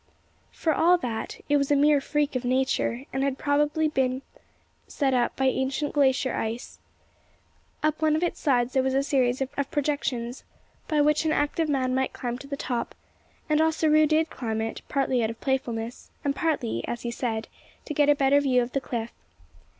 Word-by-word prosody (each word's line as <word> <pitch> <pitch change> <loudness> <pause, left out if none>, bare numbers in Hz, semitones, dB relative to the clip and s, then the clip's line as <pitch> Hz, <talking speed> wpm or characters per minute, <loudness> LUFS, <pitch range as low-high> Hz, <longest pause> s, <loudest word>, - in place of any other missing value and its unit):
For 320 - 0
all 350 +4 +4
that, 255 - -4
it 290 - +3
was 280 -1 0
a 290 - +4
mere 290 0 +4
freak 295 0 -1
of 255 - -1
Nature, 255 0 0
and 265 - -1
had 275 -1 0
probably 295 +2 +1
been 265 -3 0 0.6
set 275 -3 0
up 245 -1 +1
by 265 - 0
ancient 265 +3 0
glacier 265 -2 +2
ice. 225 +2 -4 1.0
Up 310 +1 0
one 310 -1 +3
of 315 - 0
its 350 - -1
sides 250 -4 +1
there 265 - +3
was 265 0 0
a 275 - +2
series 260 -2 +1
of 270 +1 -2
projections, 275 -5 -2 0.4
by 305 -3 +2
which 300 +1 +3
an 315 - +1
active 305 +2 0
man 260 -3 +1
might 265 0 0
climb 245 0 -4
to 275 - -10
the 280 0 -4
top; 245 -4 -3 0.5
and 305 0 +3
Ossaroo 310 -1 +3
did 315 +1 +1
climb 225 -3 -3
it, 225 0 -3
partly 265 -4 +1
out 220 - 0
of 230 - -7
playfulness, 240 -3 -3 0.2
and 280 -1 +1
partly, 280 - -1
as 240 - -4
he 240 - -2
said, 225 -2 -3 0.4
to 300 - -4
get 290 0 +3
a 290 - +6
better 280 +1 +4
view 255 -3 +3
of 240 - -6
the 275 - -1
cliff. 235 -2 -4
275 Hz, 190 wpm, -26 LUFS, 250-295 Hz, 1.0 s, a